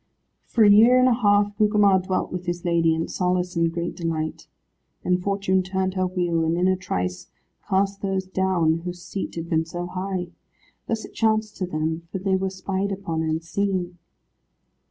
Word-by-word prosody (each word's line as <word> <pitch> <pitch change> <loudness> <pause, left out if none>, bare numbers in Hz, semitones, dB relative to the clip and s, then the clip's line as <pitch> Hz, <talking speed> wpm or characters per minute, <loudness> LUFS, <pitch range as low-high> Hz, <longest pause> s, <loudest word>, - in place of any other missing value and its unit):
For 230 - +3
a 205 - +7
year 230 +5 +7
and 255 0 +5
a 255 - +4
half 205 -3 +2
Gugemar 210 -2 +4
dwelt 185 0 -2
with 180 0 -5
his 175 +1 -3
lady, 165 -2 +3
in 160 - -2
solace 180 0 -1
and 165 0 +2
great 170 +1 -3
delight. 160 -2 -3 0.6
Then 180 0 +2
Fortune 195 0 +1
turned 190 0 -2
her 185 -1 0
wheel, 175 -3 0
and 165 +1 0
in 180 +1 +2
a 185 - +3
trice 90 - -3 0.4
cast 195 +1 +1
those 195 -1 -1
down, 185 -4 +1
whose 175 0 -7
seat 195 - -5
had 165 0 -5
been 160 -1 +1
so 175 +2 -5
high. 185 0 -4 0.6
Thus 225 -1 -2
it - - -14
chanced 220 -1 +1
to 185 - -2
them, 160 0 -3
for - - -2
they 190 0 0
were 190 0 0
spied 195 +1 -3
upon 190 -5 -3
and 160 0 -1
seen. 180 0 -2
185 Hz, 185 wpm, -24 LUFS, 170-195 Hz, 0.6 s, a